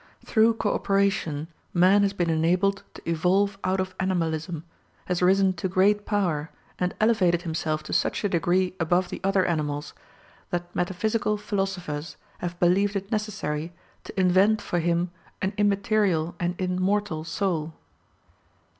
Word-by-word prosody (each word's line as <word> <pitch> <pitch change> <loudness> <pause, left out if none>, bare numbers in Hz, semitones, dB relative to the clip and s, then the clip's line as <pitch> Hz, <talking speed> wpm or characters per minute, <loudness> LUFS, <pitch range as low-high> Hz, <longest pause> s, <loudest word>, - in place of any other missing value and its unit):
Through 225 0 +4
co 215 -2 0
operation 195 -7 0 0.3
man 185 +4 +5
has 200 -1 +2
been 175 -4 0
enabled 180 +5 +2
to - - -12
evolve 190 +5 +1
out 190 +1 +1
of 185 0 -2
animalism, 165 -3 -1 0.4
has 180 -1 -1
risen 190 +1 +4
to 185 +2 -3
great 205 +3 +2
power, 170 -7 0 0.3
and 180 0 -1
elevated 185 -6 +3
himself 160 -2 -2
to - - -6
such - - 0
a 205 - +1
degree 180 +1 +1
above 175 +2 +1
the - - -6
other 195 -1 +2
animals, 150 -3 -2 0.6
that 175 0 -4
metaphysical 210 +4 0
philosophers 190 -8 -3 0.2
have 175 0 -5
believed 195 +4 +3
it 195 +1 -4
necessary 175 -7 -2 0.3
to - - -6
invent 190 +4 +4
for 175 - -2
him 170 +1 0 0.3
an 190 +1 -1
immaterial 200 -5 +1
and 175 0 -2
immortal 185 -2 0
soul. 160 -2 -2
185 Hz, 140 wpm, -26 LUFS, 170-200 Hz, 0.6 s, man